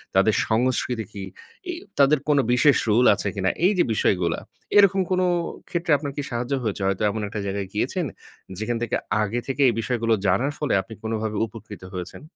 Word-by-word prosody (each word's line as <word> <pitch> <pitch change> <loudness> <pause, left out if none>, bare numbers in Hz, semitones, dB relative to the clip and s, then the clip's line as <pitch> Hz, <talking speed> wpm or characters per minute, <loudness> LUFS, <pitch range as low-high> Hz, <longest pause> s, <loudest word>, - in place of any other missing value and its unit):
তাদের - - +4
সংস্কৃতি 120 0 0
কি? 100 -2 -6 0.5
এই 350 - -2 0.2
তাদের 140 +1 +5
কোনো 145 -2 +5
বিশেষ 140 +2 +5
রুল 120 +4 +4
আছে 100 - -4
কিনা? 95 -1 +1 0.2
এইযে 185 -2 +4
বিষয়গুলা, 90 -5 +1 0.4
এরকম 195 -1 +6
কোনো 185 0 +2 0.4
ক্ষেত্রে 170 -1 -1
আপনার 145 0 -5
কি - - 0
সাহায্য 120 +3 -2
হয়েছে? 105 -2 -2
হয়তো 100 +2 0
এমন 110 +1 -3
একটা 105 - -5
জায়গায় 100 0 -3
গিয়েছেন 150 - -1 0.5
যেখান 115 +2 -2
থেকে 120 - -1 0.3
আগে 110 +4 -1
থেকে 135 +1 -2
এই 120 - 0
বিষয়গুলো 115 -1 0
জানার 120 +10 +2
ফলে 150 -4 0
আপনি 110 - -11
কোনোভাবে 110 -1 -2
উপকৃত 105 -3 -11
হয়েছেন? 90 0 -6
115 Hz, 175 wpm, -24 LUFS, 105-140 Hz, 0.5 s, এরকম